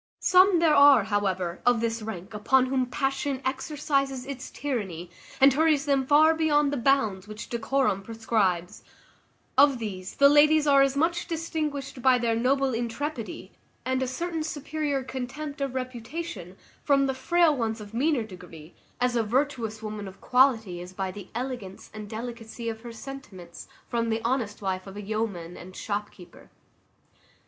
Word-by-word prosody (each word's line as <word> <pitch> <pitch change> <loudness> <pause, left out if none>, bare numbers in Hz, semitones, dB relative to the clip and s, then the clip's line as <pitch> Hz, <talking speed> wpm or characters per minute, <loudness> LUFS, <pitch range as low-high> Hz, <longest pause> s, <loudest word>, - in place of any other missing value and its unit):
Some 370 0 +5
there 330 -2 +4
are, 285 -5 +7
however, 190 -4 -1
of 245 -1 +3
this 230 0 -2
rank 215 -2 -7
upon 255 +5 +3
whom 260 -1 0
passion 270 +1 -1
exercises 275 -1 -1
its 265 -2 -7
tyranny, 190 - -4 0.3
and 270 0 +7
hurries 305 0 +2
them 275 -2 +1
far 310 +3 +6
beyond 295 -3 +2
the - - -1
bounds 220 -7 +1
which 215 +1 -8
decorum 235 -3 0
prescribes; 200 -5 -1 0.8
of 280 -2 +6
these 195 -5 -6
the 280 - +6
ladies 300 +1 +5
are 280 -1 +5
as 275 0 +2
much 340 +4 0
distinguished 305 -5 -3
by 255 0 +5
their 230 -2 0
noble 265 +3 +1
intrepidity, 235 - -4 0.3
and 260 0 0
a 260 - 0
certain 330 +5 -3
superior 295 -2 -2
contempt 265 +3 -6
of 275 -2 -2
reputation, 245 - -6 0.3
from 275 -1 +3
the 265 - 0
frail 310 +4 +3
ones 225 -3 -2
of 210 0 -10
meaner 270 +1 +1
degree, 180 -5 -12 0.3
as 250 0 +1
a 235 - +3
virtuous 230 -2 -1
woman 210 -2 -5
of 190 0 -11
quality 225 -9 +2
is 180 +1 -10
by 190 0 -3
the 195 0 -10
elegance 240 -6 -6
and 210 -1 -8
delicacy 230 0 -6
of 220 0 -6
her 240 0 -8
sentiments 220 -9 -10 0.2
from 230 -1 -1
the 225 0 -1
honest 230 -5 -1
wife 185 0 -2
of 195 +1 -9
a - - -5
yeoman 200 -5 -3
and 185 +1 -11
shopkeeper. 205 -4 -6
245 Hz, 160 wpm, -26 LUFS, 210-280 Hz, 0.8 s, are